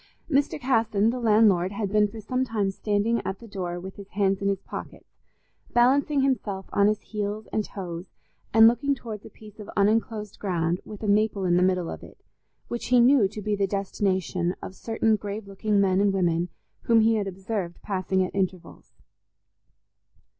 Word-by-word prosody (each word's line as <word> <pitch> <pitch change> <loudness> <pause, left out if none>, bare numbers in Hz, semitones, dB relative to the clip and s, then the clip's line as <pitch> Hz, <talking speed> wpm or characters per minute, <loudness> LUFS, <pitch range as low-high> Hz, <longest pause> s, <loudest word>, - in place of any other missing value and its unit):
Mr. 280 -2 +1
Casson, 225 -4 +2
the 250 - -4
landlord, 210 -5 +4
had 200 -1 -3
been 210 0 +4
for 220 +2 -9
some 255 +4 -1
time 215 -6 -1
standing 210 +3 0
at 190 - -3
the 230 - -13
door 180 -4 -4
with 190 +2 -9
his 200 -1 -10
hands 195 -1 0
in 200 - 0
his 195 -1 0
pockets, - - -9 0.6
balancing 275 +4 +3
himself 210 -8 -1
on 200 0 +4
his 215 0 +1
heels 210 0 -4
and 215 - +1
toes 180 -3 -7 0.4
and 225 0 +8
looking 280 +4 +2
towards 220 -5 -8
a - - -12
piece 215 -1 -15
of 210 - -9
unenclosed 210 0 0
ground, 175 -2 -1
with 210 0 -9
a - - -2
maple 205 -1 +2
in 175 -1 +3
the 180 - +3
middle 185 -2 +2
of - - -6
it, - - -13 0.5
which 240 - -4
he 250 0 +5
knew 245 -3 +5
to 210 +1 -8
be 210 +1 0
the 200 -1 0
destination 190 -2 -1
of - - -8
certain 225 +1 0
grave 205 +1 -6
looking 200 +1 0
men 190 -1 +3
and 200 -1 +3
women 175 -2 +1 0.4
whom 230 -1 +5
he 225 +1 +4
had 210 -3 0
observed 190 -2 -4
passing 190 -1 0
at 185 - -4
intervals. 185 -2 -4
205 Hz, 185 wpm, -26 LUFS, 190-225 Hz, 0.6 s, and